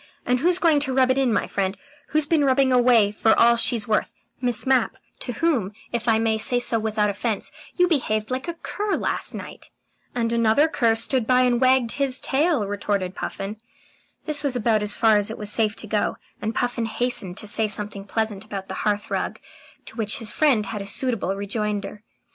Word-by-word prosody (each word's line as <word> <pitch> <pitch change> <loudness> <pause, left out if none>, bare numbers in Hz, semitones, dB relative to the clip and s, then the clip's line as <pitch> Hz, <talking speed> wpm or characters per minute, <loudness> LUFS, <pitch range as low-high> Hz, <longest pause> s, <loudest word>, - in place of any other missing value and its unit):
And 250 0 +1
who's 350 +5 +2
going 330 -5 +3
to 275 -2 0
rub 260 -1 +4
it 260 - 0
in, 260 -3 +2
my 220 - +1
friend? 195 0 -2 0.3
Who's 310 -1 +1
been 305 -1 +2
rubbing 265 -1 +3
away 240 -4 +4
for 220 +1 +2
all 235 0 +6
she's 230 -2 +1
worth? 215 - 0 0.3
Miss 245 -3 +1
Mapp, 260 -3 +2 0.2
to 245 - -4
whom, 245 - 0 0.2
if 235 0 -3
I 225 -1 +4
may 220 -1 +1
say 245 +2 0
so 240 -2 +1
without 215 -1 0
offence, 210 +1 -3 0.2
you 360 0 +3
behaved 220 -9 0
like 260 +3 -3
a 340 - -4
cur 405 +4 -3
last - - -3
night." - - -9 0.5
"And 230 -1 0
another 230 +6 +3
cur 235 -9 +1
stood 230 +1 +1
by 255 0 +4
and 245 -1 +2
wagged 255 -2 +3
his 275 -1 +1
tail," 285 -4 +1
retorted 200 -2 -2
Puffin. 200 +2 -5 0.7
This 300 -1 -1
was 275 -3 0
about 225 -2 +1
as 210 0 -2
far 220 -2 +4
as 205 0 -1
it 225 - -6
was 210 -1 -3
safe 220 -1 +1
to - - -7
go, 210 -1 -1 0.2
and 220 +1 -3
Puffin 245 -1 -1
hastened 220 -5 -1
to - - -3
say 215 +1 +2
something 205 -1 -1
pleasant 215 -1 -2
about 200 -3 -7
the - - -4
hearthrug, 205 0 -2 0.5
to - - -11
which 215 -2 -1
his 225 -2 -2
friend 265 -9 +2
had 200 +1 -5
a 200 - -7
suitable 210 -4 -1
rejoinder. 205 0 -3
230 Hz, 200 wpm, -23 LUFS, 210-260 Hz, 0.7 s, all